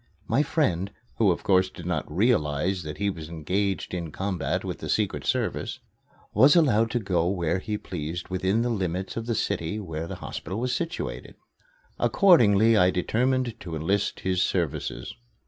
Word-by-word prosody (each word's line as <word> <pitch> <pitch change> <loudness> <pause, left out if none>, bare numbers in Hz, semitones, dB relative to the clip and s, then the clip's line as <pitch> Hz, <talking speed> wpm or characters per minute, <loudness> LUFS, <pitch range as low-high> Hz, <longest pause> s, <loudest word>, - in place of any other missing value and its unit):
My 140 - +3
friend, 100 - 0 0.3
who, 110 -4 +4
of 85 - 0
course, 95 -3 +3
did 85 - -11
not 90 -4 -2
realize 90 - +1
that 75 -2 -6
he 100 0 0
was 80 -4 -8
engaged 90 +6 -2
in 85 -3 -4
combat 95 -4 -2
with - - -4
the - - -6
Secret - - 0
Service, - - -1 0.5
was 145 +4 +6
allowed 115 -9 +4
to 120 - 0
go 90 -5 0
where 90 -2 0
he 105 +2 -3
pleased 85 -2 -5
within 95 +4 +1
the 120 - 0
limits 95 -3 -2
of 115 0 -4
the 115 - 0
city 100 -1 -1
where 80 -5 -5
the - - -5
hospital 95 - -5
was 125 +1 0
situated. 170 +3 -4 0.6
Accordingly 115 - +5
I 90 -4 +5
determined 120 +5 0
to 85 -3 -6
enlist 95 +6 -1
his 95 -1 0
services. 80 -7 -2
95 Hz, 165 wpm, -26 LUFS, 85-115 Hz, 0.6 s, was